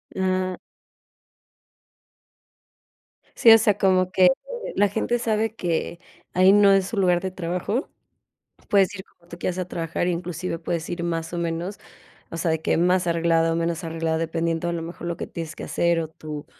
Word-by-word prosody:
Ah. 185 -1 0 2.8
Sí, 230 - +7
o 225 - +10
sea, 210 -2 +2
como 185 -2 +2
que 185 -1 +6 0.5
la 205 +1 +5
gente 225 +4 -1
sabe 220 -1 0
que 170 -2 -2 0.3
ahí 185 +2 +6
no 205 -1 +6
es 195 -1 +3
su - - -5
lugar 180 -3 +3
de 190 +1 -4
trabajo, 180 - -3 0.8
puedes 200 -1 +3
ir 190 -1 -8
como 170 0 -28
tú 170 - -9
quieras 180 0 -2
a 185 - -2
trabajar, 165 +1 -2
inclusive 175 -1 -3
puedes 165 -1 -3
ir 175 0 -3
más 165 -1 -3
o 175 - -4
menos, 170 +3 -3 0.5
o 165 - -6
sea, 165 0 0
de 160 - -1
que - - +1
más 180 +1 +2
arreglado 165 -1 +2
o 165 - 0
menos 170 0 -1
arreglado, 165 -1 -2
dependiendo 165 +1 -1
a - - -1
lo 170 -1 -3
mejor 170 +1 -7
lo 170 - -3
que - - -5
tienes 165 -1 -7
que - - -6
hacer, 170 -1 +1
o 160 - -3
tu 155 -2 -8
175 Hz, 180 wpm, -24 LUFS, 165-190 Hz, 2.8 s, o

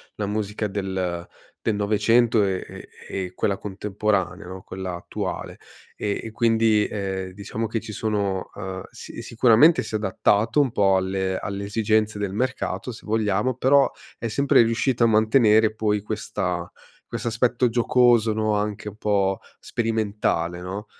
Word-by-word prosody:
la 105 - -2
musica 105 +1 -2
del 95 -3 -3 0.4
del 110 - +2
900 110 +2 +3
e 95 -2 -1
e - - -11 0.3
e 90 0 -7
quella 100 +1 0
contemporanea, 100 -2 -2
no, 95 +1 -8
quella 95 -1 -6
attuale 85 - -5 0.4
e 100 -1 -2
e 110 - -6
quindi, 110 -2 +3
ehm, 95 -2 -4
diciamo 105 +3 -4
che 115 +1 -2
ci 110 - -8
sono, 100 -3 -2
uhm 95 -1 -6
si - - -9
sicuramente 120 +7 +5
si - - -5
è - - +3
adattato 105 +3 +1
un 135 - +1
po' 95 -3 +3
alle 95 0 -1
alle 100 0 -4
esigenze 105 0 +1
del 100 -2 -2
mercato 130 +2 -2
se 115 - -11
vogliamo, 110 +2 +1
però 135 +2 +4 0.3
è 115 - -2
sempre 140 +3 +4
riuscita 115 +1 +2
a - - +5
mantenere 110 0 +4
poi 105 -1 0
questa 95 -5 -3 0.4
quest'aspetto 120 +1 0
giocoso, 120 -1 +3
no, 110 0 0
anche 105 0 -2
un 105 - -14
po' 100 -3 +1 0.2
sperimentale, 105 -7 -1
no? 95 +4 -5
105 Hz, 150 wpm, -24 LUFS, 95-115 Hz, 0.4 s, sicuramente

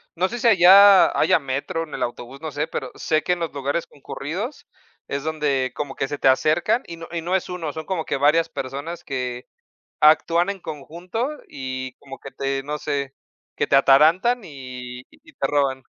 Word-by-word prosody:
no 180 +2 +1
sé 240 +4 -6
si 240 - +2
allá 195 -1 +7
haya 185 - +4
metro 140 +4 -3
en 155 - -11
el - - -5
autobús, 120 +3 -5
no 155 - -5
sé, 145 +1 -2
pero 130 -5 -5
sé 155 -1 0
que 180 - +1
en 175 - -4
los 165 -4 -3
lugares 140 +4 -2
concurridos 165 - -6 0.4
es 140 0 -3
donde 145 -5 -1
como 145 -2 -5
que 135 - -2
se 145 - -4
te - - +1
acercan, 160 - +3
y 170 - -8
no 165 - -9
y 170 - -3
no 180 +3 -1
es 190 - -1
1, 170 -5 -5
son 160 0 -6
como 180 -4 -3
que - - -2
varias 160 +4 +3
personas 140 +5 -6
que 125 -2 -4 0.5
actúan 165 +4 +4
en 200 - -4
conjunto 175 - -5 0.2
y 130 -1 -5
como 135 -1 -11
que 135 - -10
te, 135 0 -3
no 150 +2 -4
sé, 140 -2 -3 0.4
que - - 0
te - - +3
atarantan 165 - +4
y 125 -3 -9
y 320 +2 -20
te - - -2
roban. 135 -2 0
150 Hz, 200 wpm, -22 LUFS, 135-175 Hz, 0.5 s, allá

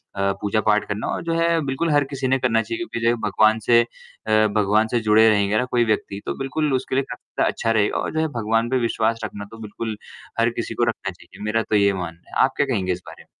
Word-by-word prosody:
अ, 100 0 +1
पूजा-पाठ 105 0 +2
करना। 100 +1 -3
और - - -2
जो 165 - 0
है 165 0 +2
बिल्कुल 135 +5 -1
हर 145 -1 +4
किसी 135 -2 -2
ने 135 +1 +3
करना 115 -3 +2
चाहिए 115 +1 -4
क्योंकि 115 - -5
जो 120 - +4
भगवान 110 +2 +3
से 115 +2 +4
अ, 120 - -5 0.7
भगवान 105 +2 +3
से 120 +1 0
जुड़े 110 +1 +6
रहेंगे 105 0 +2
ना 125 - +1
कोई 120 -1 +3
व्यक्ति 105 -2 -1
तो - - -3
बिल्कुल 140 +2 -1
उसके 130 0 -1
लिए 135 - +2
काफ़ी - - -8
ज़्यादा - - +2
अच्छा 115 - -1
रहेगा 105 -2 +2
और - - -2
जो 160 - 0
है 160 - +1
भगवान 115 +1 +1
पे 130 - +1
विश्वास 115 0 0
रखना 100 0 -5
तो 115 - -10
बिल्कुल 110 +1 -5 0.4
हर 115 +1 +4
किसी - - -3
को - - 0
रखना - - -4
चाहिए। - - -14
मेरा 110 +2 0
तो - - +2
ये 100 -1 +4
मानना 85 -2 -7
है, - - +5
आप 135 - -3
क्या 145 - +3
कहेंगे 100 -9 -1
इस 90 - -7
बारे - - -11
में? - - -34
115 Hz, 255 wpm, -22 LUFS, 105-130 Hz, 0.7 s, जुड़े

